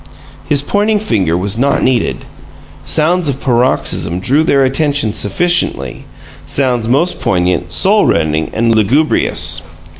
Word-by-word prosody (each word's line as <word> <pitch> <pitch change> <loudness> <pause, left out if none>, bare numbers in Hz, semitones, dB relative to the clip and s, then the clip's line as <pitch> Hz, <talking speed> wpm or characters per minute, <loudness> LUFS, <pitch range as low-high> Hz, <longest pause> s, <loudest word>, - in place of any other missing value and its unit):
His 140 -1 +3
pointing 210 +6 0
finger 95 - -1
was 100 +4 -2
not 140 +2 +1
needed. 130 -2 -1 0.6
Sounds 165 +1 +1
of 135 -1 -3
paroxysm 120 - -1
drew 140 +10 +1
their 140 -3 +2
attention 140 -4 0
sufficiently 105 - 0 0.4
sounds 125 -4 0
most 145 +9 0
poignant, 90 -1 -1
soul 205 - +3
rending, 80 -1 0
and 115 +1 0
lugubrious. 110 - +1
125 Hz, 120 wpm, -13 LUFS, 95-150 Hz, 0.6 s, His